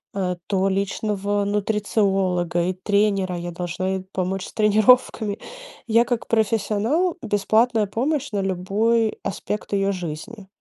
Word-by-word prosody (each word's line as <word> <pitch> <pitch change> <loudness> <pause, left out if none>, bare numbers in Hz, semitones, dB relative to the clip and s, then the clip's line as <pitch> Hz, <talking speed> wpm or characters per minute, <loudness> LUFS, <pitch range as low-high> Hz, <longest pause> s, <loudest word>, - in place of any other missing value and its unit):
э, 180 -2 -1
то 195 -1 +1
личного 200 +1 -1
нутрициолога 195 -4 0
и 185 +2 0
тренера, 195 -1 +1
я 175 0 -5
должна 180 +2 -3
ей 190 0 -1
помочь 190 +1 -2
с - - -13
тренировками. 215 0 +3 0.5
Я 230 +2 +4
как 245 -2 -2
профессионал, 225 - +1
бесплатная 220 +2 +2
помощь 275 +6 -1
на 200 - 0
любой 205 +5 0
аспект 210 +3 -4
её 195 0 +2
жизни. 185 +5 -7
205 Hz, 125 wpm, -23 LUFS, 190-220 Hz, 0.5 s, Я